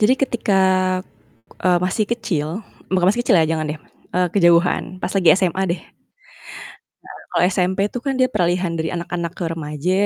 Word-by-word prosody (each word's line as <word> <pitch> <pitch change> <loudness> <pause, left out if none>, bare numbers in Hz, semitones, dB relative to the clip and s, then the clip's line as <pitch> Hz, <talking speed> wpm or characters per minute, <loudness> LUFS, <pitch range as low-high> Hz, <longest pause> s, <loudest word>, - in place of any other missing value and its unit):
Jadi 220 +4 +5
ketika, 225 -7 +1 1.0
eee, 180 -1 +3
masih 190 +4 0
kecil 170 -10 -1 0.4
bukan 185 -1 +2
masih 240 +4 +1
kecil 200 - +5
ya, 160 - +4
jangan 155 -1 -2
deh, 150 0 -5 0.4
eee, 180 0 +2
kejauhan, 175 0 +3
pas 185 - -4
lagi 190 -4 +4
SMA 190 0 0
deh. 170 - -2
Nah, - - -32 1.2
kalau - - +2
SMP 185 +1 0
itu 210 - -4
kan, 270 0 -2
dia 255 - +4
peralihan 180 -2 0
dari 160 -1 -2
anak-anak 170 -1 -4
ke - - -3
remaja 150 +1 -3
180 Hz, 165 wpm, -20 LUFS, 170-195 Hz, 1.2 s, Jadi